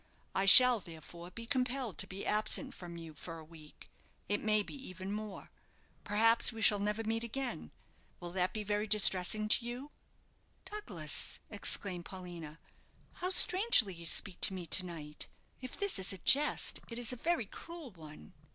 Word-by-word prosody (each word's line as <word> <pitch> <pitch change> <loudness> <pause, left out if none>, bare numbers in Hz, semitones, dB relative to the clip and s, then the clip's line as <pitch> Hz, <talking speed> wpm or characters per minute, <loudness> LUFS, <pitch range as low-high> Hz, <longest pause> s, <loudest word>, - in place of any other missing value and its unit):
I 195 +1 -1
shall, 250 +3 +10
therefore, 170 0 -12
be 230 +5 -10
compelled 250 -3 -2
to 195 - -1
be 190 +1 -8
absent 215 +1 -1
from 175 -1 -10
you 165 -2 -11
for 165 +2 -10
a 160 - -12
week; 155 -1 -16 0.4
it 205 - -2
may 215 -1 +1
be - - -11
even 190 - -9
more. 210 -1 -8 0.5
Perhaps 225 +3 +3
we 225 - -10
shall 210 -1 +3
never 210 +2 -3
meet 225 +1 -3
again. 235 - -6 0.5
Will 175 0 -9
that 180 0 -1
be 215 - -5
very 210 +1 -3
distressing 210 0 +2
to 215 - +2
you?" 250 +5 -8 0.7
"Douglas," 200 - -4
exclaimed 195 -3 -1
Paulina, 175 -5 -10 0.6
"how 365 - -1
strangely 370 - +6
you 170 -1 -8
speak 180 +3 +1
to 190 - +2
me 180 -2 -7
to 185 - +4
night! 150 -3 -7 0.3
If 255 -1 -8
this 400 - -1
is 190 - +1
a 195 - -4
jest, 290 +10 +2
it 230 - -8
is 245 0 -3
a - - -5
very 325 0 -2
cruel 330 - -11
one." 155 - -14
205 Hz, 170 wpm, -32 LUFS, 175-235 Hz, 0.7 s, shall